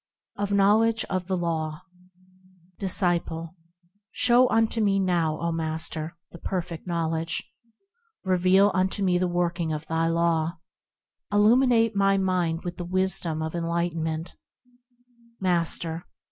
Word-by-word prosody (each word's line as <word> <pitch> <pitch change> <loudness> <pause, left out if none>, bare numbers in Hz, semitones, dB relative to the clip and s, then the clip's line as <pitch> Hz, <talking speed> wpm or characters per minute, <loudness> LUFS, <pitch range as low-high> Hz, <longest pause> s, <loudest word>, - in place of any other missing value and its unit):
7. 200 - -3
Of - - +3
Knowledge 220 +3 +3
of 185 -2 -2
the 190 -1 0
Law 160 -2 -2 1.0
Disciple. 175 -3 -1 0.5
Show 250 +1 +4
unto 225 0 +2
me 200 -2 +2
now, 170 -5 0
O 170 0 -1
Master! 160 0 -4
the 170 - -11
Perfect 175 -2 -4
Knowledge; 165 -1 -1 0.8
Reveal 190 +2 +4
unto 190 +2 0
me 180 -2 +2
the 185 - +1
working 175 -1 -1
of 155 0 -4
thy 165 +1 0
Law; 165 0 +1 0.7
Illuminate 230 +1 +4
my 195 0 +3
mind 180 -3 0
with 175 -1 -5
the 175 - -4
wisdom 175 -3 0
of 160 - -4
enlightenment, 165 -1 -2 1.1
Master. 170 -2 -1
175 Hz, 120 wpm, -26 LUFS, 165-195 Hz, 1.1 s, Show